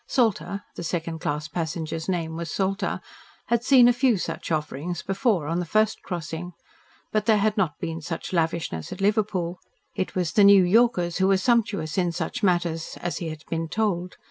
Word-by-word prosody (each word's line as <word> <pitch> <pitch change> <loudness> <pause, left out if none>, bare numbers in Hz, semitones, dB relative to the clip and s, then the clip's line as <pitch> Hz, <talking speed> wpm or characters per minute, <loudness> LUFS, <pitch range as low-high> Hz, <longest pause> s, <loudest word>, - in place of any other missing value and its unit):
Salter 200 - 0
the - - -7
second 165 -1 -3
class 150 0 -2
passenger's 160 +1 -4
name 165 -3 -1
was 170 0 -4
Salter 195 +3 -1 0.5
had 235 0 +2
seen 250 -2 +7
a 245 - +5
few 245 -3 +3
such 175 - -4
offerings 155 +2 -2
before 195 - +1
on 165 +3 -1
the - - -1
first 215 +5 +1
crossing. 175 0 -5 0.6
But 215 0 0
there 220 -2 +5
had 210 +1 +1
not 180 -8 0
been 165 0 -4
such 165 +4 -5
lavishness 165 - -1
at - - -6
Liverpool. 195 -4 0 0.3
It 185 - -3
was 180 -4 0
the 205 - +4
New 200 -1 +8
Yorkers 180 -3 +3
who 190 - +4
were 195 0 +4
sumptuous 200 -7 +1
in 175 -2 +1
such 245 +7 -3
matters, 175 -4 0
as 175 - -3
he 170 - -3
had 155 0 -8
been 165 0 -2
told. 185 -2 -1
180 Hz, 185 wpm, -25 LUFS, 165-205 Hz, 0.6 s, New